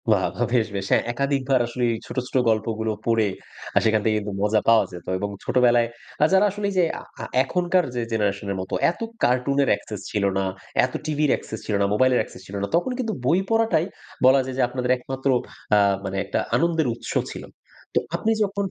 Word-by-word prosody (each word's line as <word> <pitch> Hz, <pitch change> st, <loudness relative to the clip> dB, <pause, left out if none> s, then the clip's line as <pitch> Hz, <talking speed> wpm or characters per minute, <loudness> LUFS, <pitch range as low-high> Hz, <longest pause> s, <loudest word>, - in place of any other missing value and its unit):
বাহ! -, -, +4 dB
বাহ! -, -, +1 dB
বেশ, 115 Hz, -3 st, +3 dB
বেশ, 95 Hz, -1 st, -2 dB
হ্যাঁ, -, -, +4 dB
একাধিকবার 135 Hz, 0 st, +1 dB
আসলেই 120 Hz, 0 st, 0 dB
ছোট, -, -, -9 dB
ছোট -, -, -13 dB
গল্পগুলো 110 Hz, 0 st, 0 dB
পড়ে 115 Hz, -2 st, +3 dB, 0.6 s
সেখান 110 Hz, -1 st, +3 dB
থেকে 110 Hz, -1 st, +3 dB
কিন্তু 105 Hz, -1 st, -5 dB
মজা 105 Hz, +1 st, +2 dB
পাওয়া 115 Hz, -1 st, +5 dB
যেত। 90 Hz, -1 st, -10 dB
এবং 100 Hz, -, -2 dB
ছোটবেলায় 120 Hz, -2 st, +3 dB, 0.4 s
আ -, -, +8 dB
যারা, 190 Hz, +2 st, +6 dB
আসলে 205 Hz, +1 st, -4 dB
এইযে 185 Hz, -2 st, +2 dB, 0.2 s
আ -, -, -9 dB, 0.2 s
আ -, -, -4 dB, 0.2 s
এখনকার 180 Hz, +2 st, +1 dB
যে 120 Hz, -, 0 dB
জেনারেশনের 100 Hz, -2 st, -1 dB
মত 95 Hz, -, -8 dB, 0.2 s
এত -, -, -14 dB, 0.2 s
কার্টুনের 135 Hz, +3 st, +2 dB
অ্যাক্সেস 105 Hz, -3 st, -2 dB
ছিল 105 Hz, -2 st, 0 dB
না, 95 Hz, -, +1 dB, 0.4 s
এত 130 Hz, -, -7 dB
টিভির 150 Hz, -1 st, +1 dB
অ্যাক্সেস 110 Hz, -, -4 dB
ছিল 105 Hz, -, -2 dB
না, -, -, +4 dB
মোবাইলের 130 Hz, +3 st, +3 dB
অ্যাক্সেস 110 Hz, -, -8 dB
ছিল 100 Hz, -, -8 dB
না, 100 Hz, -, -1 dB
তখন 175 Hz, +10 st, +1 dB
কিন্তু 225 Hz, -4 st, -1 dB
বই 170 Hz, +8 st, +4 dB
পড়াটাই 225 Hz, -7 st, +2 dB, 0.4 s
বলা 130 Hz, +1 st, +7 dB
যায় 130 Hz, 0 st, -5 dB
যে -, -, +2 dB
আপনাদের 125 Hz, 0 st, -1 dB
একমাত্র, 135 Hz, +2 st, -3 dB, 0.5 s
আ -, -, +6 dB, 0.3 s
মানে 95 Hz, 0 st, -3 dB
একটা -, -, -1 dB, 0.2 s
আনন্দের 165 Hz, -3 st, +2 dB
উৎস 120 Hz, -, -7 dB, 0.2 s
ছিল। -, -, -7 dB, 0.5 s
তো, -, -, +4 dB, 0.2 s
আপনি 225 Hz, -, 0 dB
যখন 200 Hz, 0 st, -2 dB
125 Hz, 195 wpm, -23 LUFS, 110-150 Hz, 0.6 s, আ